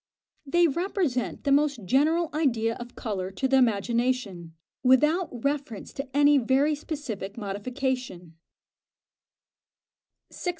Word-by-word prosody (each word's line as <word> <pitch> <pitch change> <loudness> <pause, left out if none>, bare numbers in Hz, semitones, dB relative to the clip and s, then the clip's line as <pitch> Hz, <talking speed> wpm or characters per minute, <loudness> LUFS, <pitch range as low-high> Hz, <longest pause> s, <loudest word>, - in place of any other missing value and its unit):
They 345 +4 +4
represent 330 - -2
the 280 - 0
most 280 -6 +2
general 310 - +2
idea 235 -7 +1
of 240 0 -10
colour 190 -5 -3
to 265 +8 -1
the 270 0 +3
imagination, 230 -6 0 0.3
without 300 +8 +3 0.2
reference 280 -7 -3
to 275 0 -5
any 290 0 +6
very 270 +5 +2
specific 280 -10 -6
modification. 225 - -4 2.0
611. 360 - -4
260 Hz, 110 wpm, -26 LUFS, 225-290 Hz, 2.0 s, any